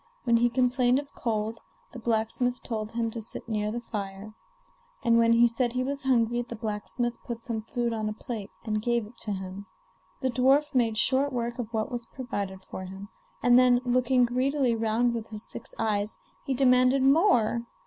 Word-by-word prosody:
When 235 -1 +4
he 240 +1 +3
complained 250 0 +2
of 285 0 -5
cold, 220 -1 -2 0.3
the 250 - -8
blacksmith 235 +2 0
told 220 -2 -4
him 230 -1 -1
to 230 - -5
sit 220 - -6
near 210 -2 -1
the 240 +2 -4
fire; 205 -2 -6 0.7
and 230 -2 +4
when 230 0 +5
he 235 +1 +6
said 235 +1 -1
he 255 0 0
was 275 +1 -3
hungry, 240 -2 +2
the 235 -1 -7
blacksmith 225 +2 -2
put 230 -2 -6
some 225 -2 -3
food 235 +1 -2
on 215 -1 -2
a - - -3
plate 215 -2 -6 0.2
and 215 -1 -1
gave 235 0 0
it 220 +3 -15
to 215 - -4
him. 190 +1 -6 0.5
The 260 -2 0
dwarf 270 +5 +3
made 230 -4 +2
short 270 +4 +2
work 240 -1 -3
of 230 -2 -4
what 220 +3 -2
was 240 -2 -4
provided 200 -7 -5
for 185 - -7
him, 195 +2 -9 0.3
and 245 0 +7
then, 250 -1 +5
looking 250 0 +3
greedily 255 +1 +1
round 225 +2 +1
with 225 -1 -4
his 215 -1 -8
six - - -8
eyes, 210 -1 -1 0.3
he 270 - 0
demanded 255 +1 +4
more. 265 - +3
235 Hz, 190 wpm, -27 LUFS, 220-250 Hz, 0.7 s, and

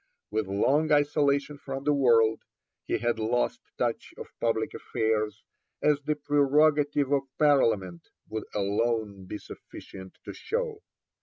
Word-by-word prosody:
With 110 -2 -1
long 140 +11 +2
isolation 145 -1 +2
from 135 -1 -6
the 150 +1 +2
world, 115 -5 +4 0.5
he - - +1
had 120 -1 -1
lost 120 +3 0 0.2
touch - - -2
of - - -10
public 115 -1 0
affairs, 110 -1 -2 0.4
as 150 -1 +2
The 150 +1 -1
Prerogative 145 0 +2
of 140 -1 +1
Parliament 115 - +2 0.2
would 110 -1 -5
alone 105 -1 -1
be 105 - -5
sufficient 95 -2 -12
to - - -6
show. 450 -1 -3
135 Hz, 130 wpm, -27 LUFS, 110-145 Hz, 0.5 s, world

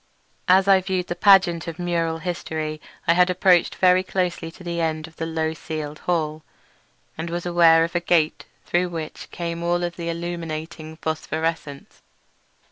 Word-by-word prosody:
As 190 +1 +5
I 195 -1 +6
viewed 185 -1 -2
the 175 - -4
pageant 180 -4 +4
of 165 0 -5
mural 170 -2 -1
history 160 -3 -4 0.3
I 170 - +6
had 180 +1 +4
approached 180 -1 +3
very 185 0 +4
closely 180 -3 -2
the 170 0 -5
end 155 -1 -1
of 160 0 -16
the 165 - -3
low 160 -1 -1
ceiled 155 -1 -6
hall, 155 -3 0 0.8
and 165 +1 -3
was 175 +1 -4
aware 170 -2 +5
of 170 - -3
a 175 - +1
great 175 - -24
gate 160 -3 +2 0.2
through 180 +1 +1
which 160 -2 -7
came 170 -1 -4
all 175 +1 0
of 175 -1 -3
the 170 -1 -4
illuminating 165 -2 -5
phosphorescence. 160 -2 -3
170 Hz, 165 wpm, -23 LUFS, 160-175 Hz, 0.8 s, I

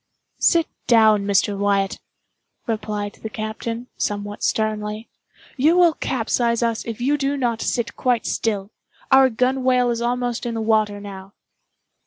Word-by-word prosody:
"Sit 335 -1 +4 0.2
down, 220 -4 +5
Mr. 200 0 +2
Wyatt," 200 -1 0 0.7
replied 210 -2 -3
the 220 - -5
captain, 225 +2 -5
somewhat 205 0 -3
sternly, 215 0 -1 0.5
"you 310 +7 +4
will 345 -2 +5
capsize 235 -3 0
us 230 -1 -1
if 230 -1 -5
you 285 +4 +1
do 275 +1 0
not 235 -4 -1
sit 235 - -2
quite 245 -2 0
still. 205 -2 -2 0.4
Our 265 0 +7
gunwhale 250 0 +2
is 235 0 -2
almost 245 0 -1
in 230 - -3
the - - -2
water 215 -2 +1
now." 195 -1 -10
225 Hz, 140 wpm, -22 LUFS, 210-250 Hz, 0.7 s, Our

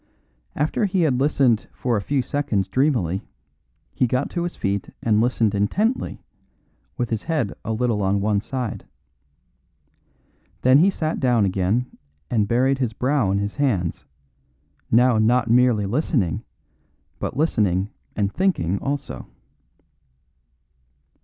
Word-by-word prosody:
After 155 +8 0
he 190 -2 0
had 135 -6 +2
listened 135 -5 +2
for 125 -2 -1
a 105 - 0
few 135 +5 0
seconds 120 -11 -1
dreamily, 110 - +1 0.7
he 125 - +1
got 125 +2 -1
to 175 - -2
his 175 - -5
feet 100 0 -2
and 110 -1 +3
listened 115 -3 +1
intently, 200 - 0 0.7
with 120 -3 -2
his 110 -1 -1
head 150 -10 -1
a 110 - -3
little 110 -1 0
on 100 +1 +1
one 100 0 +1
side. 125 -2 -5 1.8
Then 130 +2 +6
he 185 +5 +5
sat 160 -5 -2
down 120 -5 +3
again 95 +6 0 0.5
and 110 -4 +2
buried 130 +4 +2
his 120 -4 -1
brow 130 -3 +1
in 100 - +1
his 100 +4 -3
hands, 105 - 0 0.9
now 120 0 +4
not 115 +1 +2
merely 120 -4 +4
listening, 110 - 0 0.8
but - - -4
listening 105 - +1 0.2
and 100 -1 -1
thinking 155 - 0
also. 140 -1 -4
120 Hz, 130 wpm, -22 LUFS, 100-140 Hz, 1.8 s, Then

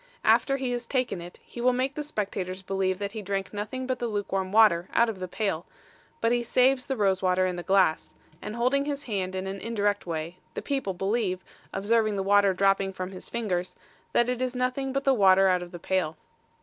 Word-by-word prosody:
After 275 -1 +4
he 260 -2 -2
has 240 -1 -3
taken 250 -9 -1
it, 175 +1 -11
he 240 - -8
will 250 +1 +4
make 260 +2 0
the 300 - -4
spectators 195 -9 -4
believe 190 -1 0
that 200 0 -4
he 220 0 -6
drank 195 0 -3
nothing 215 +6 -4
but 255 -1 -2
the 240 - -1
luke 205 -2 -3
warm 190 -1 -1
water 205 -5 +5
out 235 0 +4
of 210 -4 -5
the 185 - -4
pail; 180 -3 -2 0.5
but 230 - +2
he 240 0 +2
saves 255 +2 +2
the 270 - -1
rose 195 -3 +2
water 185 0 +2
in 180 -1 -1
the 175 - -4
glass, 190 -3 +2 0.3
and 210 - -6
holding 255 +4 +2
his 285 -1 -3
hand 190 -6 -3
in 185 0 -3
an 195 +1 -4
indirect 205 -4 -1
way, 165 +2 -4 0.2
the - - -3
people 270 -10 -2
believe, 195 -1 -1 0.3
observing 215 +1 +1
the 195 - -1
water 200 0 +4
dropping 195 +1 +2
from 185 0 -5
his 185 - -9
fingers, 185 -6 -2 0.4
that 240 - +3
it 250 0 -1
is 255 0 -1
nothing 255 +2 -1
but 275 +1 -1
the 270 - +4
water 195 -4 +5
out 180 -1 +3
of 175 - -7
the 175 - -7
pail. 170 -3 -1
200 Hz, 225 wpm, -27 LUFS, 185-245 Hz, 0.5 s, water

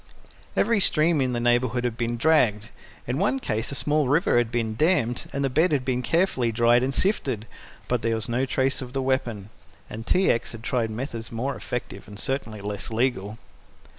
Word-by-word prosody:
Every 230 -3 +3
stream 160 -4 +3
in 130 -1 0
the 120 - -1
neighbourhood 120 0 +1
had 120 -2 -1
been 120 0 -2
dragged. 115 -7 +2 0.3
In 125 +4 -2
one 210 +8 +2
case 110 - -2
a - - -2
small 150 0 +1
river 145 -2 +3
had 120 -2 -1
been 115 -2 -1
dammed, 125 -5 +1
and 140 - -2
the - - +2
bed 160 +6 +3
had 135 -4 0
been 125 -1 0
carefully 145 -7 +1
dried 120 +2 +4
and 130 +2 0
sifted, 135 - 0 0.4
but 125 -2 0
there 115 0 0
was 110 -3 -3
no 125 +3 0
trace 135 +2 0
of 125 -1 -8
the 135 - -1
weapon, 120 -6 -2 0.4
and 115 +1 -7
T. 185 +1 +4
X. 115 - -2
had 115 -1 -9
tried 120 -4 0
methods 115 0 -5
more 130 +4 -2
effective 125 -1 -6
and 100 0 -10
certainly 115 -6 -2
less 100 0 -4
legal. 110 -3 -1
125 Hz, 195 wpm, -25 LUFS, 115-140 Hz, 0.4 s, dried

